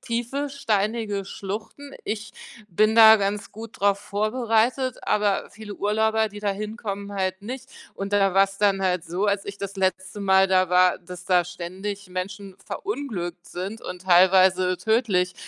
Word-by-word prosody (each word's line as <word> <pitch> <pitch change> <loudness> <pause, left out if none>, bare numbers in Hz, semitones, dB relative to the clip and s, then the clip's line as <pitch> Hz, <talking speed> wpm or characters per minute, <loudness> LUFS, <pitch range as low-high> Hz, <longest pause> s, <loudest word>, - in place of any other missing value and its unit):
tiefe, 245 +5 -3
steinige 215 -5 -1
Schluchten. 220 +9 -7
Ich 215 0 -4 0.4
bin 215 +4 +2
da 220 -1 +9
ganz 205 +1 -2
gut 225 +1 -10
drauf 200 0 +3
vorbereitet, 225 +4 0
aber 205 -2 0
viele 210 -1 -9
Urlauber, 220 +1 +1
die 205 +1 -10
da 205 -1 0
hinkommen, 205 -1 -5
halt 190 0 -2
nicht, 255 +4 -7 0.3
und 195 +1 -5
da 195 -2 +3
war's 195 +1 +3
dann 200 -1 +2
halt 180 -2 0
so, 180 +4 -2
als 200 -1 0
ich 200 0 -8
das 200 0 -6
letzte 190 +1 -2
Mal 190 -1 +4
da 185 -1 +3
war, 180 0 +4
dass 180 0 -10
da 180 -2 +3
ständig 185 +3 -6
Menschen 190 +2 -6
verunglückt 205 - -5
sind 195 +5 -6
und 180 0 -7
teilweise 185 0 +4
tödlich. 205 -5 +1
200 Hz, 155 wpm, -24 LUFS, 185-220 Hz, 0.4 s, da